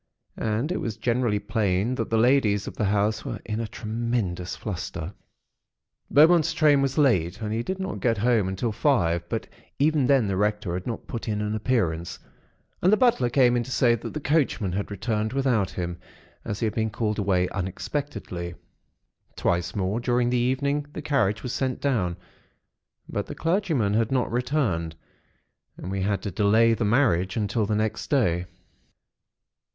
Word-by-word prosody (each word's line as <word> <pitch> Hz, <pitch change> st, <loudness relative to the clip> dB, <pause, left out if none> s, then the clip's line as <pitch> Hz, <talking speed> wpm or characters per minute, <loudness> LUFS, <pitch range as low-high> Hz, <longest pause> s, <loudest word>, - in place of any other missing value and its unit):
And 115 Hz, +8 st, -1 dB
it 185 Hz, -, -2 dB
was 110 Hz, -3 st, -3 dB
generally 120 Hz, -3 st, +1 dB
plain 105 Hz, 0 st, 0 dB
that 115 Hz, -3 st, -3 dB
the 115 Hz, -, +2 dB
ladies 110 Hz, -4 st, +3 dB
of -, -, -7 dB
the 105 Hz, -, -1 dB
house 105 Hz, +2 st, +1 dB
were -, -, -5 dB
in 110 Hz, 0 st, -3 dB
a 115 Hz, -, -2 dB
tremendous 110 Hz, -5 st, -3 dB
fluster. 90 Hz, -3 st, -5 dB, 1.0 s
"Beaumont's 165 Hz, +2 st, +5 dB
train 150 Hz, -4 st, +4 dB
was 135 Hz, -1 st, -1 dB
late, 100 Hz, -, +2 dB
and 110 Hz, -1 st, -3 dB
he 115 Hz, -, 0 dB
did 190 Hz, +9 st, -3 dB
not 190 Hz, -1 st, -4 dB
get 115 Hz, -2 st, +1 dB
home 110 Hz, -2 st, +2 dB
until 95 Hz, +5 st, -2 dB
five, 85 Hz, -, +1 dB
but -, -, -3 dB, 0.3 s
even 145 Hz, -2 st, +2 dB
then 135 Hz, -4 st, +4 dB
the 100 Hz, -2 st, -1 dB
Rector 105 Hz, -2 st, 0 dB
had 90 Hz, +1 st, -4 dB
not 115 Hz, -, -4 dB
put 115 Hz, -, -6 dB
in 105 Hz, -1 st, -1 dB
an 105 Hz, 0 st, -2 dB
appearance; 95 Hz, -8 st, -1 dB, 0.6 s
and 185 Hz, -, +4 dB
the 215 Hz, -, +5 dB
butler 215 Hz, -, +3 dB
came 125 Hz, -1 st, +4 dB
in 120 Hz, -, +2 dB
to 120 Hz, -, -7 dB
say 120 Hz, -2 st, +3 dB
that 115 Hz, -, -4 dB
the -, -, -1 dB
coachman 140 Hz, -, +1 dB
had 100 Hz, +3 st, -3 dB
returned 110 Hz, +2 st, -2 dB
without 125 Hz, -8 st, +1 dB
him, 90 Hz, -1 st, -4 dB, 0.4 s
as 100 Hz, -, -4 dB
he -, -, +2 dB
had 110 Hz, -, -1 dB
been 110 Hz, -1 st, 0 dB
called 105 Hz, 0 st, -2 dB
away 95 Hz, -3 st, +2 dB
unexpectedly. 95 Hz, -, -4 dB, 0.8 s
Twice 85 Hz, 0 st, -1 dB
more 100 Hz, +2 st, -1 dB
during 120 Hz, 0 st, +1 dB
the -, -, +1 dB
evening 140 Hz, +4 st, 0 dB
the 155 Hz, -, -6 dB
carriage 115 Hz, -8 st, +1 dB
was 125 Hz, -, -3 dB
sent 130 Hz, -2 st, -1 dB
down; 100 Hz, -11 st, 0 dB, 0.9 s
but -, -, -3 dB
the -, -, -7 dB
clergyman 165 Hz, -, +1 dB
had 115 Hz, +2 st, +1 dB
not 130 Hz, -2 st, +1 dB
returned; 115 Hz, -, -1 dB, 0.8 s
and 90 Hz, -, -6 dB
we 95 Hz, 0 st, -2 dB
had 100 Hz, +1 st, -1 dB
to 100 Hz, -, -3 dB
delay 110 Hz, +5 st, +4 dB
the 115 Hz, -1 st, -1 dB
marriage 105 Hz, -6 st, +2 dB
until 105 Hz, 0 st, 0 dB
the 105 Hz, -, 0 dB
next 110 Hz, +1 st, -2 dB
day. 90 Hz, -, +1 dB
110 Hz, 175 wpm, -25 LUFS, 100-130 Hz, 1.0 s, Beaumont's